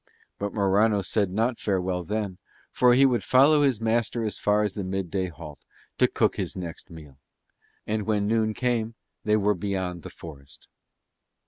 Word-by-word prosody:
But 100 0 -2
Morano 100 +1 +2
said 100 0 0
not 115 +5 -1
farewell 95 -2 -1
then, 100 0 -3 0.3
for 125 -1 +4
he 135 +2 +6
would 120 -5 +2
follow 145 +4 +5
his 135 -6 +2
master 115 +1 0
as 105 - -4
far 105 +1 +2
as 105 -2 -1
the 100 - -4
midday 95 0 -2
halt 80 -3 -11 0.4
to - - +5
cook - - 0
his - - -3
next 85 0 -7
meal. 75 -5 -13 0.7
And 105 -1 -2
when 105 -2 +1
noon 110 0 +1
came 115 -3 -1 0.3
they 105 0 +3
were 105 0 +2
beyond 95 -2 -3
the - - -9
forest. 70 -4 -12
105 Hz, 165 wpm, -26 LUFS, 90-110 Hz, 0.7 s, he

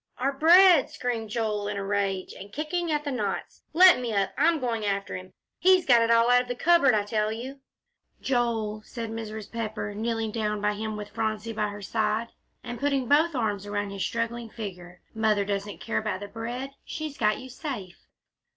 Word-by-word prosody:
"Our 270 +2 0
bread!" 340 +2 +6
screamed 230 -3 -3
Joel, 210 -2 -1
in 205 -1 -3
a 200 - -3
rage, 195 -2 -1
and 200 - -11
kicking 320 - -2
at 300 -1 0
the 290 - -3
knots. 255 - -3
"Let 360 -1 +7
me 245 -2 -3
up! 195 -2 0
I'm 315 +4 +3
going 235 -4 -2
after 200 -1 -2
him. 185 0 -9 0.3
He's 370 0 +5
got 240 -3 +6
it 230 - +2
all 230 +1 +5
out 245 0 +6
of 250 - -8
the 245 - -3
cupboard, 330 -4 +4
I 210 - +2
tell 215 0 0
you!" 255 +5 -6 0.6
"Joel," 230 -4 -1
said 230 0 -6
Mrs. 220 -2 -6
Pepper, 215 -2 -4
kneeling 225 +1 -2
down 210 -1 -1
by 210 0 +1
him, 215 +1 -4
with 210 0 -7
Phronsie 220 0 -2
by 210 -1 0
her 205 0 -8
side, 220 +2 -1 0.3
and 240 -1 -6
putting 275 -3 0
both 305 +3 +3
arms 205 -4 -1
around 205 -1 -2
his 195 -1 -3
struggling 230 0 -3
figure, 180 -5 -8
"Mother 215 -2 +1
doesn't 200 0 -3
care 230 - -1
about 210 -3 -3
the 205 - -5
bread; 240 +5 -5
she's 310 -3 -5
got 210 -4 +1
you 260 - -9
safe." 250 - -7
225 Hz, 195 wpm, -27 LUFS, 210-255 Hz, 0.6 s, Let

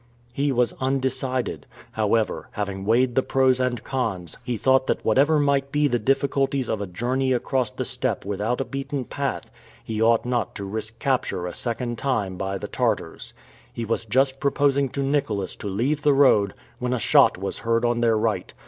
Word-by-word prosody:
He 140 +2 0
was 125 -2 +1
undecided. 130 -1 -1 0.2
However, 110 0 0
having 100 -2 -4
weighed 120 +3 +3
the 130 - +3
pros 130 -1 +2
and 125 -3 -1
cons, 95 - -3
he 120 -1 -2
thought 130 +2 +3
that - - -1
whatever 140 +7 +4
might 140 -1 +1
be 150 0 +2
the 120 -3 0
difficulties 135 +1 +1
of 105 - -2
a 100 - -3
journey 130 +8 0
across 125 0 0
the 130 0 -5
steppe 125 -6 0
without 105 +4 -1
a 135 - -1
beaten 135 -1 -4
path, 140 +2 -4 0.3
he 110 -1 -3
ought 115 +1 +4
not 120 -5 -1
to 100 - -5
risk 110 +3 -5
capture 130 -9 -1
a 90 - -4
second 120 -1 -3
time 105 -9 -1
by 95 +1 -3
the - - -6
Tartars. - - -2 0.4
He 115 - -4
was 115 +1 -2
just 130 +4 +1
proposing 140 -1 +2
to 140 +2 -3
Nicholas 125 -9 -1
to - - -6
leave 125 +10 0
the 145 -1 +4
road, 110 -8 +4 0.2
when 125 0 -1
a - - +1
shot - - +5
was 95 +1 -4
heard 115 +1 +1
on 120 0 +1
their 115 -2 +3
right. 110 -4 -1
125 Hz, 185 wpm, -24 LUFS, 110-135 Hz, 0.4 s, shot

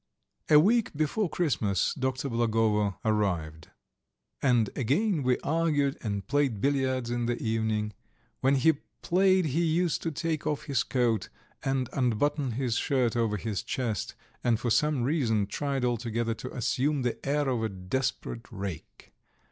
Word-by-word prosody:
A 150 - +8
week 220 +7 +3
before 155 +6 0
Christmas 115 - 0
Dr. 130 0 -2
Blagovo 110 -3 +1
arrived. 90 -8 -1 0.7
And 120 -5 +3
again 155 - +1
we 125 -1 +2
argued 150 -3 +1
and 100 -3 -3
played 140 -7 +1
billiards 130 -2 0
in 120 -1 -1
the 120 0 0
evenings. 110 -2 -1 0.5
When 135 +1 +3
he 145 +2 +3 0.2
played 185 0 +3
he 155 +4 +1
used 170 +1 +1
to 165 - -1
take 155 0 -2
off 150 -2 -1
his 140 -5 0
coat 115 -4 0 0.3
and 135 -2 0
unbutton 135 +2 0
his 125 -1 -1
shirt 125 -6 +1
over 115 -3 +1
his 105 0 -3
chest, 115 -6 -3 0.3
and 115 -3 +2
for 120 -1 -1
some 150 0 +2
reason 120 -7 +1
tried 135 +5 -2
altogether 115 -1 -1
to 130 +3 -7
assume 135 +3 0
the 120 - -2
air 145 +1 0
of 125 -4 0
a 110 - 0
desperate 115 +4 -3
rake. 95 -6 -7
125 Hz, 150 wpm, -28 LUFS, 110-145 Hz, 0.7 s, A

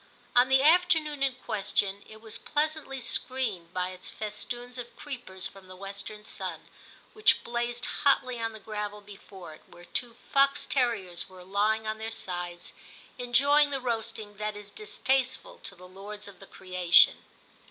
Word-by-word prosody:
On 245 +1 +6
the 265 0 +6
afternoon 320 -3 +4
in 270 -2 +2
question 200 -3 -1
it 220 0 -12
was 225 0 -7
pleasantly 300 -2 -1
screened 235 -8 -1
by 180 0 -1
its 185 - -6
festoons 240 +4 -5
of 240 -1 -7
creepers 240 -10 -5
from 190 -1 -7
the 185 - -10
western 200 +2 -7
sun, - - -4 0.5
which 430 0 +4
blazed 240 0 -1
hotly 255 -3 +2
on 225 0 -1
the 220 - -9
gravel 210 -1 -4
before 195 -4 -11
it, - - -15
where 175 - -14
two 235 +3 -2 0.2
fox 275 0 +4
terriers 220 -10 0
were 185 -1 -12
lying 210 +3 +1
on 215 0 -2
their 220 0 -3
sides 175 -5 -4 0.5
enjoying 280 +5 +5
the 275 -1 -1
roasting 225 -4 -3
that 210 0 -2
is 205 0 -10
distasteful 265 - -1
to 195 - -7
the 180 0 -13
lords 205 +3 -9
of 200 -2 -12
the 195 - -12
creation. 185 -2 +5
220 Hz, 160 wpm, -29 LUFS, 195-255 Hz, 0.5 s, On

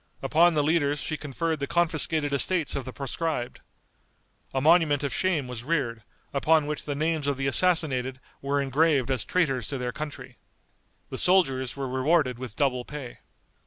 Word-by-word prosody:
Upon 170 +1 +4
the 150 - +2
leaders 145 -2 +1
she 155 - -3
conferred 155 +2 -3
the 140 - -3
confiscated 160 -3 +2
estates 155 +3 +2
of 135 - -3
the 130 - -6
proscribed. 140 -1 -4 0.9
A 135 - -1
monument 150 -1 +4
of 140 - -2
shame 170 -8 0
was 125 -2 -7
reared, 130 -7 -1 0.3
upon 155 +2 +3
which 150 0 -4
the 145 - -3
names 155 0 -1
of 140 -2 0
the 135 - -2
assassinated 135 -5 +1 0.2
were 140 +1 0
engraved 140 -1 +2
as 125 -6 0
traitors 135 - 0
to 140 - -3
their 125 -1 -3
country. 150 0 -7 0.7
The - - -4
soldiers 135 -9 +2
were 135 -1 -3
rewarded 130 0 +1
with 125 -4 -7
double 130 -4 0
pay. 140 -3 -8
145 Hz, 165 wpm, -26 LUFS, 130-160 Hz, 0.9 s, Upon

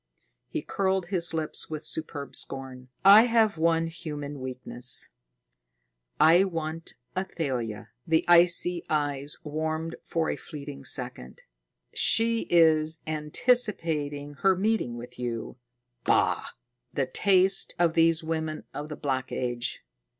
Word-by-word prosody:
He - - -4
curled 190 -2 -1
his 175 -3 +1
lips 160 -1 -3
with 155 0 -5
superb 150 -3 -3
scorn. 130 -1 -5 0.2
"I 205 +4 +9
have 225 -7 +2
one 165 0 +2
human 150 -4 -6
weakness. 125 -1 +1 1.1
I 165 +5 +6
want 165 -3 -4 0.2
Athalia." 130 - -3 0.2
The 160 0 +2
icy 175 0 +4
eyes 145 -2 -1
warmed 155 +2 -3
for 165 -1 -1
a - - -2
fleeting 140 -3 -9
second. 125 - -4 0.5
"She 230 0 +2
is 160 -2 +4
anticipating 155 - 0
her 190 -1 +4
meeting 195 - 0
with 120 +1 -10
you 120 -1 -4 0.5
bah! - - +2 0.4
The 135 - 0
taste 190 +7 +3
of 170 -2 +2
these 165 0 +3
women 160 -1 -3
of 150 +1 -6
the 150 - -5
Black 130 -3 -3
Age! 120 -1 -3
160 Hz, 120 wpm, -27 LUFS, 140-175 Hz, 1.1 s, I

